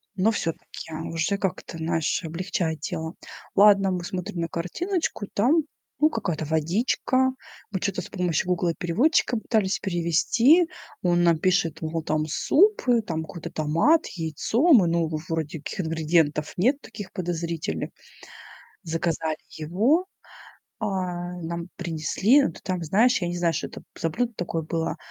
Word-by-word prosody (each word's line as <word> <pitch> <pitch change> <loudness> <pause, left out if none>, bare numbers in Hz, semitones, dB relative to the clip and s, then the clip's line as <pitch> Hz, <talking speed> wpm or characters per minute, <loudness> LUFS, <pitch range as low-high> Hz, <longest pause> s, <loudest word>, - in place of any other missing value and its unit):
но 200 +4 +3
всё-таки 165 -4 -5 0.2
уже 165 +5 0
как-то, 185 -3 -3
знаешь, 165 +1 0
облегчает 165 -1 -2
дело. 160 +1 -4 0.4
Ладно, 200 -1 +6
мы 180 -1 -2
смотрим 180 -1 -4
на 165 - 0
картиночку, 210 - -2
там, 280 +10 +3 0.4
ну 305 +1 +5
какая-то 175 - -2
водичка. 205 - +1 0.4
Мы 190 - -1
чё-то 185 -1 -1
с - - -10
помощью 180 -3 -1
"Гугла-переводчика" 180 - +1
пытались 215 -3 0
перевести. 200 - +3 0.4
Он 175 -1 +3
нам 170 -1 +4
пишет, 165 -3 +1
мол, 160 0 -2
там 155 0 0
суп, 400 - +3
э, 240 -2 +5
там 160 -7 -3
какой-то 160 +1 -8
томат, 170 - +2
яйцо, 195 - +1
мы, 200 -9 +6
ну, 165 -1 +1 0.2
вроде 160 -1 -2
таких 150 - -4
ингредиентов 160 -2 +1
нет, 260 +10 +2
таких 205 -3 -9
подозрительных. 170 - -3 0.9
Заказали 160 -1 -1
его, 215 - +1 0.7
а, 180 -4 -3
нам 170 +1 -4
принесли, 175 - +2
ну 275 - +1
ты - - -13
там, 185 -2 -2
знаешь, 210 +9 +3
я 175 - 0
не 175 0 -3
знаю, 170 -1 +1
что 155 - -2
это - - -11 0.2
за 165 - 0
блюдо 240 +7 -1
такое 170 -3 -3
было, 165 +1 -2
175 Hz, 145 wpm, -25 LUFS, 165-210 Hz, 0.9 s, Ладно